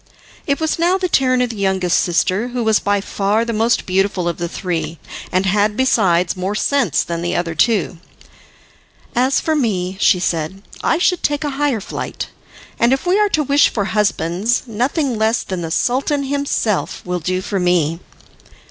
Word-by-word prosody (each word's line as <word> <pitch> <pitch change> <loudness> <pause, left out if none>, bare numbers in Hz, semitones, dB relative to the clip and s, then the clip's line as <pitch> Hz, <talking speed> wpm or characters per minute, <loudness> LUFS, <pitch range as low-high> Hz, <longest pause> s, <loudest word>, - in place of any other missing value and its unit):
It 280 -1 +1
was 315 0 -1
now 350 +3 +3
the 375 -1 -1
turn 255 -5 +2
of 245 - -2
the 225 - -9
youngest 190 -3 +1
sister, 185 +5 +1
who 245 -1 -3
was 220 -1 +3
by 205 0 0
far 205 +3 0
the 230 - -3
most 225 +2 +1
beautiful 190 -1 0
of 170 - -2
the 170 0 -3
three, 170 -3 -3 0.3
and 185 +1 +1
had, 205 +2 +1
besides, 185 -9 +2
more 190 +3 -3
sense 230 - +1
than 170 -1 -4
the 175 +1 -2
other 170 -1 -1
two. 190 -1 +1 1.2
"As 260 +3 +2
for 315 - 0
me," 190 -9 -1
she 180 - +4
said, 175 +2 -2 0.2
"I - - +2
should 360 0 +1
take 290 +1 0
a 295 - -2
higher 275 -4 0
flight; - - -5 0.5
and 235 +1 +4
if 270 - -2
we 370 +3 +3
are 420 -1 +3
to 310 -5 +1
wish 285 +1 +4
for 205 -3 -2
husbands, 205 +1 0
nothing 250 +2 -1
less 220 +2 +1
than 185 -2 -4
the 165 - -4
Sultan 275 - 0
himself 275 -7 -1
will 180 0 -2
do 185 +3 -1
for 195 +1 -3
me." 170 -3 +1
210 Hz, 185 wpm, -18 LUFS, 180-265 Hz, 1.2 s, she